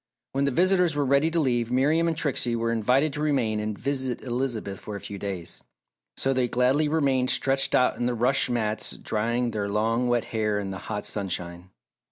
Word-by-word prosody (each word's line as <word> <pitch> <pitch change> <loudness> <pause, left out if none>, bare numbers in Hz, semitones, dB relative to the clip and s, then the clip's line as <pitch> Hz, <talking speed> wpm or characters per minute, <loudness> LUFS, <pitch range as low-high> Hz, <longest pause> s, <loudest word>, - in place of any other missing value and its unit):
When 135 +1 0
the - - +2
visitors 180 +2 +3
were 145 -1 +1
ready 140 +4 +3
to 165 +1 0
leave, 120 -5 +1
Miriam 150 +6 +2
and 165 -2 -1
Trixie 125 -6 0
were 115 0 -1
invited 125 +6 +2
to 150 - -4
remain 130 -8 +1
and 105 -1 -3
visit 130 -1 -2
Elizabeth 120 -6 -3
for 105 - -7
a - - -5
few 100 0 -7
days. 95 -4 -6 0.5
So 135 - +1
they 130 -1 +1
gladly 130 +5 +2
remained 135 -5 +1
stretched 135 0 +2
out 125 - +3
on 120 - -1
the 125 - -1
rush 125 +3 +2
mats 110 -3 -1
drying 120 +3 -1
their 105 -2 -2
long 115 +4 +1
wet 120 -2 +1
hair 105 -2 0
in 100 -1 -3
the 95 - -6
hot 105 - -3
sunshine. 90 -3 -4
125 Hz, 200 wpm, -26 LUFS, 110-140 Hz, 0.5 s, visitors